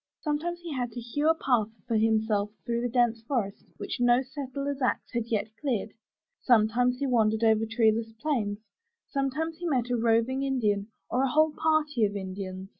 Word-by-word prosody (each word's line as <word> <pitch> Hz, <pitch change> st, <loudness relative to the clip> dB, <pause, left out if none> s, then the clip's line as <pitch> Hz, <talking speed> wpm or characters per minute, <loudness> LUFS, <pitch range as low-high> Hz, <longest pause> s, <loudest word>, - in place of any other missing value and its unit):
Sometimes 330 Hz, +3 st, -2 dB
he 335 Hz, -3 st, -5 dB
had 245 Hz, -3 st, -2 dB
to 240 Hz, -, -5 dB
hew 290 Hz, +7 st, 0 dB
a 325 Hz, -, +4 dB
path 245 Hz, -9 st, +1 dB, 0.2 s
for 230 Hz, -, 0 dB
himself 215 Hz, -2 st, +2 dB, 0.2 s
through 235 Hz, -1 st, -1 dB
the 245 Hz, -, -1 dB
dense 240 Hz, -2 st, +2 dB
forest 225 Hz, -5 st, -3 dB
which -, -, -5 dB
no 245 Hz, +1 st, +4 dB
settler's 275 Hz, +1 st, -5 dB
axe 250 Hz, -, 0 dB
had 235 Hz, -1 st, -1 dB
yet 220 Hz, -1 st, -2 dB
cleared; 240 Hz, -7 st, -1 dB, 0.5 s
sometimes 245 Hz, +1 st, +3 dB
he 280 Hz, -, -2 dB
wandered 220 Hz, -3 st, +2 dB
over 220 Hz, 0 st, +3 dB
treeless 225 Hz, -1 st, +2 dB
plains; 225 Hz, -5 st, -1 dB, 0.5 s
sometimes 310 Hz, +4 st, -2 dB
he 350 Hz, -, -3 dB
met 250 Hz, -5 st, 0 dB
a -, -, +2 dB
roving 230 Hz, +3 st, +2 dB
Indian 215 Hz, -7 st, 0 dB, 0.2 s
or 250 Hz, -, 0 dB
a 270 Hz, -, +2 dB
whole 310 Hz, +3 st, +3 dB
party 305 Hz, -6 st, +1 dB
of 205 Hz, -1 st, +1 dB
Indians. 190 Hz, -1 st, -6 dB
240 Hz, 180 wpm, -28 LUFS, 220-275 Hz, 0.5 s, a